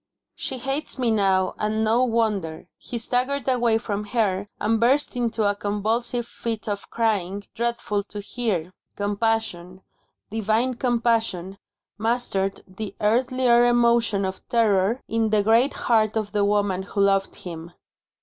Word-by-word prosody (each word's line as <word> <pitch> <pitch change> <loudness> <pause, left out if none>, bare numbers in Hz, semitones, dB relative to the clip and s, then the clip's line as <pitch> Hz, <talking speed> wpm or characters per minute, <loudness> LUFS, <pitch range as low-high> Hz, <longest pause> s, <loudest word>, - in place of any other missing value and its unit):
"She 260 - -3
hates 270 +5 -2
me 245 -3 +1
now, 195 -3 +2
and 215 +1 0
no 225 +3 +3
wonder." 215 -9 -1
He 240 - -5
staggered 255 +4 0
away 240 -3 +3
from 210 -2 -3
her, 205 -3 0
and 220 +1 +1
burst 260 +5 +2
into 230 -3 0
a 205 - +2
convulsive 225 +4 -1
fit 230 -2 -5
of 200 -1 -4
crying, 205 -4 0
dreadful 235 -3 -1
to 210 - -7
hear. 200 -5 -2 0.2
Compassion, 205 -3 -2 0.5
divine 225 +4 +1
compassion, 230 -6 0 0.4
mastered 220 -4 -1
the 195 +2 -7
earthlier 240 +2 +3
emotion 235 -4 +3
of 190 0 -4
terror 220 0 +2
in 225 -1 0
the 210 -1 +3
great 230 +6 +4
heart 220 -2 +3
of 210 -2 -2
the 205 -1 +1
woman 205 -2 +1
who 200 +1 -6
loved 195 -1 +2
him. 170 -1 -8
220 Hz, 140 wpm, -24 LUFS, 200-235 Hz, 0.5 s, great